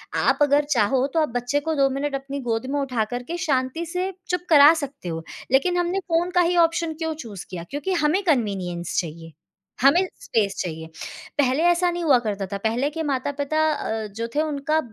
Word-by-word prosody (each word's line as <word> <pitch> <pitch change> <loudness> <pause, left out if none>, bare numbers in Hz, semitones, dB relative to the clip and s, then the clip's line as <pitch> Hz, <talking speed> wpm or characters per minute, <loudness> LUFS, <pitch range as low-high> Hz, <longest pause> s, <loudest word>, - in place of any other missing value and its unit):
आप - - +2
अगर 290 0 +4
चाहो 255 +1 +3
तो 330 - +2
आप 305 - +1
बच्चे 245 +4 0
को 320 +2 -1
2 275 -2 +3
मिनट 275 +1 -2
अपनी 275 +1 -5
गोद 230 -1 -2
में 290 - 0
उठा 255 -5 0
कर 245 0 -3
के 340 +6 -5
शांति 285 -1 -1
से 360 +3 -2 0.2
चुप 360 0 0
करा 295 0 +8
सकते 285 - -5
हो। 165 0 -4 0.3
लेकिन 320 +7 +3
हमने 355 +2 0
फ़ोन 350 0 0
का 355 - +6
ही 350 0 +2
ऑप्शन 330 -1 +2
क्यों 320 0 -3
चूज़ 220 - -8
किया? 175 -2 -5
क्योंकि 290 +7 -2
हमें 340 +2 +2
कन्वीनियंस 195 - -1
चाहिए, 165 -1 -9 0.5
हमें 335 +9 +5
स्पेस 210 - 0
चाहिए। 160 -2 -5 0.5
पहले 270 +3 +3
ऐसा 350 +1 +3
नहीं 345 0 -3
हुआ 280 -6 +5
करता 205 -4 -3
था, - - -1
पहले 230 +7 0
के 320 +1 -3
माता-पिता 285 +1 -1
अ, 220 -5 -3
जो 225 +3 -5
थे 300 - +3
उनका 305 0 0
280 Hz, 200 wpm, -23 LUFS, 230-325 Hz, 0.5 s, करा